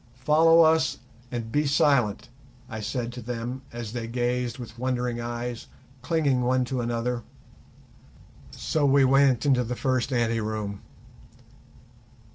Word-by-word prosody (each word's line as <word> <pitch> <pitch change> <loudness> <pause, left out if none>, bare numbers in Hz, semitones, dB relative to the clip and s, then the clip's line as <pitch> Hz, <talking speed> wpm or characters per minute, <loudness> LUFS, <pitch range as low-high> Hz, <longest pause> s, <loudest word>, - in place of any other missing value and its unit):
"Follow 165 +2 +6
us 160 0 +3 0.3
and 115 -2 -4
be 150 +2 +1
silent," 140 -7 +2 0.4
I 110 -3 -6
said 120 +2 -3
to 125 - -7
them 120 +2 -5
as 120 -2 -6
they 120 -2 -4
gazed 120 0 -1
with 115 -2 -10
wondering 125 -1 -1
eyes, 120 0 -5 0.3
clinging 140 -2 +1
one 125 +1 +1
to 125 0 -2
another. 120 +1 -2 1.3
So 155 - -2
we 140 -1 +5
went 135 -1 +4
into 130 -3 +3
the 125 +1 -4
first 130 0 0
ante 115 -2 +1
room. 105 -2 -4
125 Hz, 130 wpm, -26 LUFS, 120-135 Hz, 1.3 s, Follow